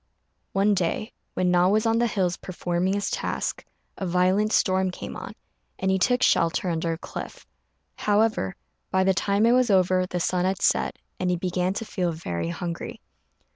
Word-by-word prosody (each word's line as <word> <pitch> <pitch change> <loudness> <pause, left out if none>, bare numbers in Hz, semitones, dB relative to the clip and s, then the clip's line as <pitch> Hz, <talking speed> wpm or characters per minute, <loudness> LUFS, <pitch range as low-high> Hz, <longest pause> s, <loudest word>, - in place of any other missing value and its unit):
One 200 +2 +3
day, 190 +4 -1 0.2
when 180 -1 +2
Na 180 0 +4
was 215 +3 +2
on 225 0 +3
the 240 - +3
hills 185 -5 0
performing 180 +1 -2
his 200 - -2
task, - - -2 0.4
a 190 - -2
violent 185 +4 +2
storm 190 -2 +2
came 180 - -7
on, - - -7 0.4
and 190 0 0
he 190 - +2
took 245 +5 +2
shelter 170 +1 +2
under 165 0 -1
a - - -5
cliff. - - -8 0.5
However, 210 - +1 0.3
by 190 0 +2
the 190 0 +3
time 200 +4 +2
it 235 - +5
was 250 -1 +4
over 185 -1 +3
the 180 - -3
sun 180 +1 0
had 190 +1 0
set, - - +1 0.2
and 180 - 0
he 180 - +2
began 180 +1 -1
to 225 - -3
feel 180 -4 -1
very 85 - -4
hungry. 175 - -5
185 Hz, 180 wpm, -25 LUFS, 175-205 Hz, 0.5 s, it